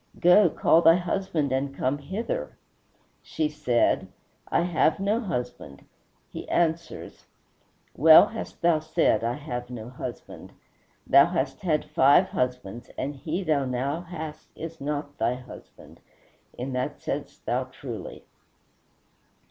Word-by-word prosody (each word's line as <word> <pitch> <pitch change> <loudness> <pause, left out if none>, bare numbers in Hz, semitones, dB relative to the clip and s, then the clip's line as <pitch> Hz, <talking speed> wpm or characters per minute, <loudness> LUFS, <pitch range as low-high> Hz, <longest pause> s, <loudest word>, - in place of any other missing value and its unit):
"Go, 180 +2 +6
call 165 +1 +3
thy 165 0 +7
husband 175 -4 -1
and 135 +1 -1
come 135 +3 0
hither." 230 - -4 0.6
She 155 -1 -2
said, 150 -6 +1 0.4
"I - - +1
have 170 -1 +2
no 205 +4 +1
husband." 125 - -5 0.4
He - - -9
answers, 170 0 -2 0.7
"Well 160 +6 +8
hast 225 -5 -8
thou 170 -2 +4
said 155 -8 +1
I 120 +1 0
have 125 -4 -6
no 120 -2 -7
husband; 125 -1 -8 0.5
thou 140 +2 +6
hast 175 -1 -2
had 160 -5 0
five 150 +4 +4
husbands, 125 -3 -3
and 145 +1 -3
he 165 +7 -3
thou 150 -5 +1
now 135 +5 -2
hast 160 -3 -8
is 165 -1 -8
not 145 0 -4
thy 120 +2 +1
husband; 125 -1 -13 0.6
in 130 +2 -4
that 125 0 -3
saidst - - -5
thou - - 0
truly." - - -9
150 Hz, 130 wpm, -26 LUFS, 130-170 Hz, 0.7 s, Well